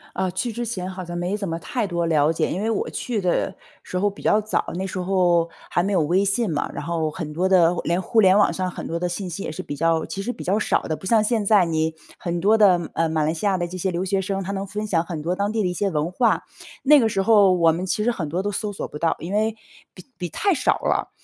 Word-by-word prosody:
呃， 190 -1 0
去 190 +7 -2
之 240 +2 -4
前 200 -6 -4
好 185 0 -6
像 175 0 -6
没 180 +3 -1
怎 200 -3 -4
么 165 - -2
太 215 +6 -3
多 170 -2 -1
了 155 -2 +3
解， 165 - 0
因 185 - -2
为 220 - 0
我 220 - -1
去 240 -4 -3
的 180 -3 0 0.3
时 180 - -4
候 200 +3 +2
比 200 - -13
较 210 - +3
早， 215 +1 -1
那 190 - -2
时 190 0 -4
候 180 -2 +2 0.2
还 175 - +2
没 195 +3 -1
有 185 -5 +3
微 175 +6 +2
信 200 +2 0
嘛， 145 - -1
然 - - -6
后 165 -2 -1
很 155 -1 -6
多 180 +4 0
的 175 -2 +5
连 170 +1 0
互 220 +4 +2
联 190 -1 +6
网 210 - +4
上 185 -1 -2
很 - - -7
多 170 - -3
的 180 0 -1
信 185 +2 -4
息 180 +3 -6
也 - - -4
是 155 - -6
比 145 - -6
较 165 +2 +1
其 195 - -5
实 240 - -2
比 - - -9
较 195 +4 +1
少 - - +1
的， 155 - -2
不 190 - -8
像 220 0 +4
现 220 0 +1
在 200 -2 +4
你 160 -1 -1 0.2
很 175 0 -2
多 205 +5 +4
的， 180 -5 +4
呃， 165 -1 +1
马 155 -1 0
来 155 +1 +1
西 170 +5 -2
亚 195 -2 +2
的 175 -1 -2
这 175 - -8
些 185 +1 -1
留 180 +1 -2
学 190 0 0
生， 195 +1 -2
他 190 - -4
能 195 0 -4
分 210 +3 -4
享 170 -6 +1
很 170 -2 -5
多 170 +4 -2
当 200 +2 -1
地 220 -1 0
的 - - +1
一 180 - -2
些 200 +3 0
文 160 -1 -1
化。 230 +4 +2 0.4
那 295 +2 +7
个 225 -3 +2
时 195 -2 0
候 205 -3 +6
我 170 -2 +4
们 170 +3 -3
其 190 +3 -1
实 240 - +2
很 165 -10 -4
多 175 +5 -2
都 205 - -1
搜 210 +1 -3
索 200 - -5
不 150 - -9
到， 165 0 +1
因 175 +4 -6
为 220 +1 +1 0.4
比 180 - -12
比 175 -2 -3
太 395 - +1
少 255 -6 +2
了。 - - 0
185 Hz, 315 characters per minute, -23 LUFS, 170-205 Hz, 0.4 s, 那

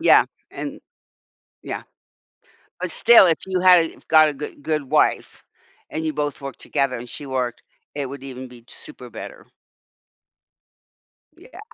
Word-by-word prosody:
Yeah, 330 - +6 0.3
and - - -7 0.8
Yeah. - - -5 1.0
But - - +2
still, 235 -4 +7
if 165 -3 +3
you 185 -1 -1
had 180 -1 +7
a 165 - -1
have - - -22
got 155 -1 +6
a - - -4
good 145 +1 -8
good 150 0 -1
wife, 135 - 0 0.5
and 160 +1 -4
you 155 - -1
both 145 -1 -3
work 135 -1 -7
together, 135 -3 -1
and 120 +1 -9
she 145 - -7
worked, 130 -3 -3 0.3
it 140 -2 -2
would 140 -1 -8
even 130 -1 -8
be 125 -1 -14
t 115 - -16
super 310 - -11
better. - - -10 1.9
Yeah. 405 +8 -14
145 Hz, 160 wpm, -22 LUFS, 130-165 Hz, 1.9 s, still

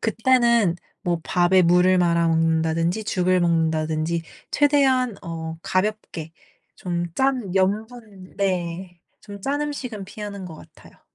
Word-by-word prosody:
그때는 235 -5 +2 0.3
뭐 170 -2 -1
밥에 180 +1 +3
물을 180 +2 +4
말아 170 -1 +2
먹는다든지 165 +4 +1
죽을 185 -2 +1
먹는다든지 160 -1 0 0.3
최대한 265 -6 +2
어 165 -1 -6
가볍게 185 -5 -2 0.4
좀 175 -1 -3
짠 255 -7 0
염분 205 0 -2
네 180 -2 -2 0.2
좀 200 -1 -10
짠 285 +2 -1
음식은 250 -9 -5
피하는 200 -2 -7
것 160 - -9
같아요. - - -17
185 Hz, 250 characters per minute, -23 LUFS, 170-220 Hz, 0.4 s, 물을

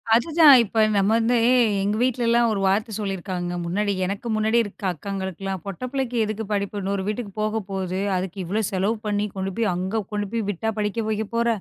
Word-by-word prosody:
அதுதான், 305 +3 +7
இப்ப 220 0 +1
நம்ம 195 +1 +3
வந்து 230 +2 +2
எ - - +5 0.3
எங்க 205 +1 0
வீட்லலாம், 235 -1 +2
ஒரு 205 - -1
வார்த்த 215 +4 0
சொல்லியிருக்காங்க, 185 -3 -3
முன்னாடி 200 +4 0
எனக்கு 200 +5 -4
முன்னாடி 220 +2 +2
இருக்கிற 200 -2 -5
அக்காங்களுக்குலாம், 190 +2 -5
"பொட்ட 195 0 -7
பிள்ளைக்கு 265 -3 -2
எதுக்கு 215 0 -4
படிப்பு? 200 0 -2
இன்னொரு 195 0 -1
வீட்டுக்கு 210 -1 -3
போக 215 +1 0
போது. 190 -1 -2 0.2
அதுக்கு 185 +1 -3
இவ்ளோ 210 +6 -1
செலவு 195 +4 0
பண்ணி 205 0 0
கொண்டு 190 0 -2
போய், 220 -5 +1
அங்க 190 +5 -2
கொண்டு 205 -1 -1
போய் 225 -3 -2
விட்டா 220 +4 -1
படிக்க 210 +2 -1
வைக்க 220 0 -1
போற?" 235 0 +2
205 Hz, 185 wpm, -23 LUFS, 195-225 Hz, 0.3 s, அதுதான்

